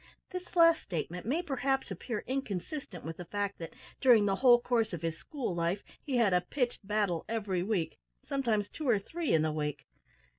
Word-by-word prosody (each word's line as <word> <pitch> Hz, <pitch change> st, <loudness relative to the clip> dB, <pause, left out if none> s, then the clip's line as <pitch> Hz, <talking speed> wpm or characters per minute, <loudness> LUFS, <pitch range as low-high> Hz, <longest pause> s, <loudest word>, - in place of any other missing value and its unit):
This 365 Hz, 0 st, -7 dB
last 335 Hz, -1 st, +6 dB
statement 175 Hz, +2 st, -4 dB
may 315 Hz, +8 st, +1 dB
perhaps 270 Hz, -3 st, -1 dB
appear 230 Hz, -5 st, -4 dB
inconsistent 260 Hz, -, -4 dB
with 160 Hz, 0 st, -5 dB
the 180 Hz, -, -7 dB
fact 200 Hz, +2 st, -3 dB
that, 165 Hz, -, -7 dB, 0.2 s
during 235 Hz, -5 st, +6 dB
the 195 Hz, -1 st, +1 dB
whole 245 Hz, 0 st, +7 dB
course 230 Hz, -4 st, +1 dB
of 170 Hz, -1 st, -5 dB
his 165 Hz, -1 st, -1 dB
school 255 Hz, -, -4 dB
life, 170 Hz, +3 st, -1 dB, 0.2 s
he 270 Hz, -4 st, -1 dB
had 220 Hz, -6 st, +4 dB
a 180 Hz, -, +4 dB
pitched 240 Hz, +1 st, -2 dB
battle 205 Hz, -6 st, +1 dB
every 205 Hz, -5 st, -1 dB
week 180 Hz, -5 st, -1 dB, 0.3 s
sometimes 225 Hz, -7 st, 0 dB
two 300 Hz, +3 st, -4 dB
or 225 Hz, -, +5 dB
three 320 Hz, -, -3 dB
in 160 Hz, -1 st, +4 dB
the 155 Hz, -, +1 dB
week. 150 Hz, -1 st, -3 dB
210 Hz, 190 wpm, -31 LUFS, 180-265 Hz, 0.3 s, whole